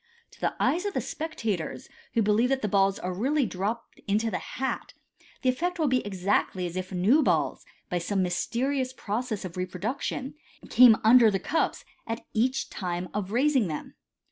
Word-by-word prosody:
To - - -20
the - - 0
eyes 355 +5 +1
of 405 - -4
the - - +2
spectators, 225 - -4 0.3
who 230 - +4
believe 215 +4 +3
that 265 -2 0
the - - +2
balls 195 0 +3
are 180 0 -4
really 270 +9 +1
dropped 210 +4 -4
into 215 +3 +1
the 180 - -1
hai. 265 +1 -3 0.6
the 255 - +3
effect 350 +8 -1
will 315 -3 +1
be 255 -1 +2
exactly 190 -1 0
as 175 0 -5
if 185 +1 -4
new 200 - +4
balls, - - 0 0.2
by 175 - -1
some 190 +2 0
mysterious 255 +8 -1
pro 220 -2 -2
cess 220 -6 -4
of 180 0 -7
reproduction, 205 +9 -3 0.4
came 245 -3 +8
under 230 +1 +7
the 195 - +1
cups 305 - -1 0.2
at 225 0 -4
each 255 +4 0
time 180 -1 -3
of 205 -2 -3
raising 260 -2 +3
them. 155 -2 -5
220 Hz, 180 wpm, -27 LUFS, 185-260 Hz, 0.6 s, came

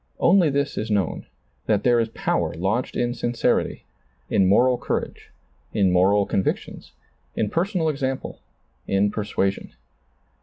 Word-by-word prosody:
Only 175 -2 +4
this 140 +1 -1
is 110 - -4
known, 100 -3 -1 0.4
that 105 -2 +1
there 120 -1 +4
is 115 -1 0
power - - -1
lodged 95 +9 -1
in 120 0 0
sincerity, 120 -1 -1 0.5
in 95 - +3
moral 125 +6 +4
courage, - - -4 0.5
in 95 -3 +3
moral 100 +3 +3
convictions, 95 - -3 0.4
in 105 - -1
personal 180 -1 0
example, 135 -3 -3 0.5
in 100 +1 +2
persuasion. 100 -2 -2
110 Hz, 125 wpm, -23 LUFS, 100-130 Hz, 0.5 s, Only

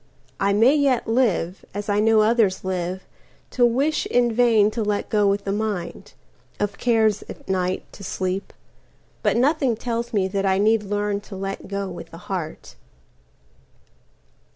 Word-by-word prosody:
I 200 +1 +2
may 225 +7 +5
yet 280 -5 +2
live, 215 -7 0
as 205 0 -4
I 205 0 +1
know 220 0 +4
others 215 -3 +2
live, 185 0 -3 0.5
To 250 - +1
wish 275 +6 0
in 240 -1 +2
vain 220 -3 +4
to 225 - -3
let 210 -1 -1
go 210 -2 +3
with 200 0 +1
the 195 - -2
mind—Of 205 0 -5
cares, 220 -4 +2
at - - -10
night, 185 -1 -1
to 200 - -11
sleep; 185 +1 -3 0.7
but - - +1
nothing 270 -1 +2
tells 235 +1 -3
meThat 195 -3 0
I 190 -1 +2
need 215 +2 +3
learn 205 0 -2
to 205 -1 -10
let 195 +1 -5
go 200 0 -3
with 175 -2 -8
the 165 - -11
heart. 175 -3 -6
205 Hz, 155 wpm, -23 LUFS, 195-230 Hz, 0.7 s, may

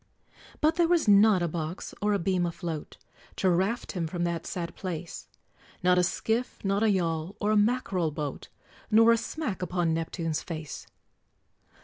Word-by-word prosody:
But 315 +2 +3
there 340 -1 +4
was 340 -6 +2
not 205 -2 +6
a - - +1
box 165 +2 -5
or 210 +1 +2
a - - +3
beam 180 -1 0
afloat, 165 -2 -5 0.4
To 185 - +2
raft 190 +7 0
him 170 -3 -2
from 175 +2 -3
that 170 -1 -2
sad 170 -2 -4
place; 175 -3 -6 0.6
Not 180 0 +4
a - - +3
skiff, 225 +7 -1
not 195 +1 +1
a 220 - +4
yawl, 170 -2 -1
or 210 - +1
a - - +3
mackerel 205 -6 +1
boat, 145 -2 -5 0.4
Nor 225 +1 +6
a - - +6
smack 240 - -4
upon 175 -2 0
Neptune's 165 -1 -2
face. 155 -4 -7
180 Hz, 165 wpm, -28 LUFS, 165-210 Hz, 0.6 s, not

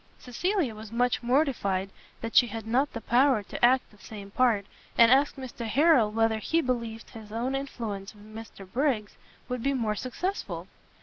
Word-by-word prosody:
Cecilia 320 - -1
was 215 0 -10
much 245 +2 +1
mortified 235 -8 0 0.3
that 230 0 -5
she 245 - +7
had 225 0 -6
not 255 +6 +1
the 230 - -6
power 245 0 +3
to - - -8
act 255 +2 +4
the 210 - -20
same 200 -2 -9
part, 225 -4 +2 0.3
and 230 0 +7
asked 275 +2 +4
Mr 255 -3 -6
Harrel 275 -2 +4
whether 225 0 +1
he 325 +9 +1
believed 235 -5 -3
his 220 -2 -11
own 240 +4 -2
influence 225 -7 -5
with 205 0 -16
Mr 220 -3 -10
Briggs 235 -2 -1 0.3
would 250 -1 -3
be 275 +3 0
more 225 -4 0
successful. 260 - -4
235 Hz, 175 wpm, -28 LUFS, 215-265 Hz, 0.3 s, she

